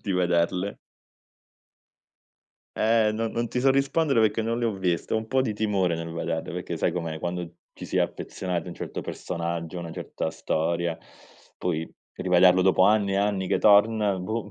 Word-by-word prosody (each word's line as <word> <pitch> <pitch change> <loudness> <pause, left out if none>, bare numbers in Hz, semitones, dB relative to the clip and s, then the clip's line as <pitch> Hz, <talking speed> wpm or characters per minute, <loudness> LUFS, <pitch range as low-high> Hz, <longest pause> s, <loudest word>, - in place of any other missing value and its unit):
di 100 - -2
vederle. 90 +2 +1 2.0
Eh, 110 0 +3
no 115 +1 -1
non 115 +1 -2
ti 125 - -2
so 135 +1 +4
rispondere, 135 0 +2
perché 110 +1 +2
non 115 +1 -1
le 120 - -1
ho 115 - 0
viste. 90 -3 -1
Ho - - +3
un 110 0 -3
po' 130 +3 +1
di 115 - -1
timore 100 -5 +1
nel 80 0 -5
vederle 85 - -3
perché, - - -4
sai - - 0
com'è, 85 -3 -3
quando 85 0 -4 0.2
ci - - -10
si - - -3
è - - +4
affezionati 90 -3 -3
a - - -6
un 85 - -7
certo - - -5
personaggio, 85 0 -4
una 85 -1 -6
certa - - -4
storia, 85 +1 -1 0.6
poi 80 -2 -2 0.2
rivederlo 90 0 +4
dopo 95 0 +4
anni 100 -1 +3
e - - +1
anni 100 -1 0
che - - +2
torna, 105 -1 +4
boh, 105 +3 -4
95 Hz, 180 wpm, -26 LUFS, 85-110 Hz, 2.0 s, so